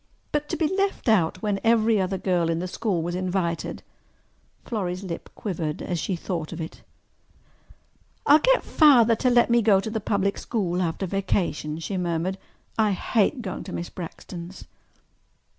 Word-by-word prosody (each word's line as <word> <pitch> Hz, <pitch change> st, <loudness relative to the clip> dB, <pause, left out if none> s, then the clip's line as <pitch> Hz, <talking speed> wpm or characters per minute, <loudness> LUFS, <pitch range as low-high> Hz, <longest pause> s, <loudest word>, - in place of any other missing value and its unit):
But 295 Hz, 0 st, -1 dB
to -, -, -2 dB
be 320 Hz, -, +2 dB
left 395 Hz, -7 st, 0 dB
out 180 Hz, -5 st, +2 dB
when 205 Hz, -2 st, 0 dB
every 225 Hz, -2 st, +4 dB
other 190 Hz, +1 st, -1 dB
girl 175 Hz, -3 st, +1 dB
in 165 Hz, -, +1 dB
the 180 Hz, +2 st, -3 dB
school 180 Hz, -2 st, -1 dB
was 175 Hz, +1 st, -3 dB
invited! 180 Hz, -2 st, -2 dB, 0.8 s
Florrie's 185 Hz, -4 st, -3 dB
lip 175 Hz, -3 st, -6 dB
quivered 160 Hz, -7 st, -3 dB
as 175 Hz, -2 st, -2 dB
she 190 Hz, -, -1 dB
thought 170 Hz, -2 st, -4 dB
of 170 Hz, -, -6 dB
it. 160 Hz, 0 st, -7 dB, 1.4 s
"I'll 295 Hz, +2 st, +7 dB
get -, -, +3 dB
Father 240 Hz, -7 st, +6 dB
to 255 Hz, -, +2 dB
let 240 Hz, -1 st, +4 dB
me 235 Hz, -, +5 dB
to 225 Hz, -, -1 dB
go 200 Hz, -3 st, +6 dB
to 220 Hz, +3 st, -4 dB
the 220 Hz, -1 st, -2 dB
public 200 Hz, 0 st, 0 dB
school 185 Hz, -6 st, -1 dB
after 175 Hz, +2 st, -1 dB
vacation," 175 Hz, -5 st, -1 dB
she 165 Hz, +4 st, -4 dB
murmured. 180 Hz, +2 st, -1 dB, 0.4 s
"I 215 Hz, -2 st, +3 dB
hate 230 Hz, +6 st, +1 dB
going 190 Hz, -, -5 dB
to -, -, -7 dB
Miss 170 Hz, -, -4 dB
Braxton's." 175 Hz, +1 st, -8 dB
190 Hz, 170 wpm, -25 LUFS, 175-220 Hz, 1.4 s, I'll